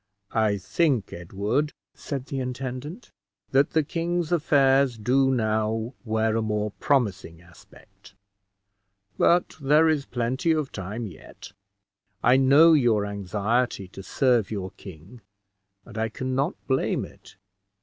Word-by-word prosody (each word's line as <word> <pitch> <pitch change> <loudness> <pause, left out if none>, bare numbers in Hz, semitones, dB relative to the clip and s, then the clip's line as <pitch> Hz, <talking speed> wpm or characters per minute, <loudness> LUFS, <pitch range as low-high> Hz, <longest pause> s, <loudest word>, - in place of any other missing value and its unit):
"I 110 -2 +1
think, 125 - 0
Edward," 100 - -2 0.2
said 135 -3 -6
the 135 -1 -4
intendant, 130 - -6 0.4
"that 135 +1 +3
the 160 - +3
king's 170 +2 -2
affairs 140 -6 +3
do 130 +5 +2
now 110 -1 -1
wear 110 -1 0
a 115 - +1
more 105 -1 -2
promising 100 - 0
aspect; 85 +2 -19 1.0
but 175 +1 +2
there 150 +4 +4
is 150 -3 0
plenty 125 +7 0
of 155 -3 -2
time 105 +5 -5
yet. 95 - -12 0.7
I 125 +2 +5
know 140 +5 +6
your 120 -8 +3
anxiety 100 +2 -1
to 95 - -10
serve 120 0 +1
your 95 -3 -4
king, 95 +6 -13 0.6
and 110 -2 -8
I 110 0 0
can 130 +4 -4
not 140 +7 0
blame 130 -1 0
it. - - -17
125 Hz, 130 wpm, -25 LUFS, 105-140 Hz, 1.0 s, know